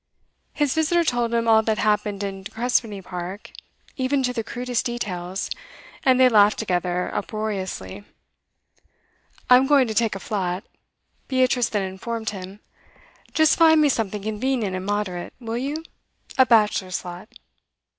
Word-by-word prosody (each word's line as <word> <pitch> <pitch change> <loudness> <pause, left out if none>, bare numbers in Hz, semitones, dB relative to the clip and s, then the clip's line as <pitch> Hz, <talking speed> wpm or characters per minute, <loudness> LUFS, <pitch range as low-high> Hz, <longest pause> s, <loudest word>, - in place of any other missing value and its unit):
His 295 -3 +1
visitor 320 +2 +2
told 240 -6 0
him 230 0 0
all 220 -1 +6
that 220 -1 0
happened 210 -1 0
in 195 -1 -4
De 195 - -8
Crespigny 225 -4 -1
Park, 180 +3 -7 0.5
even 265 +1 +1
to 250 -1 0
the 230 -2 -2
crudest 245 +1 -2
details, 190 -6 -4 0.6
and 260 -1 +4
they 260 - +7
laughed 210 -3 +5
together 180 -3 -1
uproariously. 195 - -4 1.4
'I'm 255 +1 +6
going 275 -3 +5
to 220 - -3
take 225 -1 +1
a - - -5
flat,' 185 -3 -2 0.6
Beatrice 255 -2 +2
then 205 -2 -1
informed 220 +4 -4
him. 195 0 -9 0.7
'Just 315 +1 +4
find 320 -1 +7
me 300 -1 +4
something 210 -5 -1
convenient 220 -1 -1
and 185 +1 -5
moderate, 205 -4 -3
will 230 -2 -5
you? 290 +5 -3 0.5
A 260 -1 +5
bachelor's 210 -5 +2
flat. 180 +3 -9
220 Hz, 145 wpm, -23 LUFS, 195-250 Hz, 1.4 s, they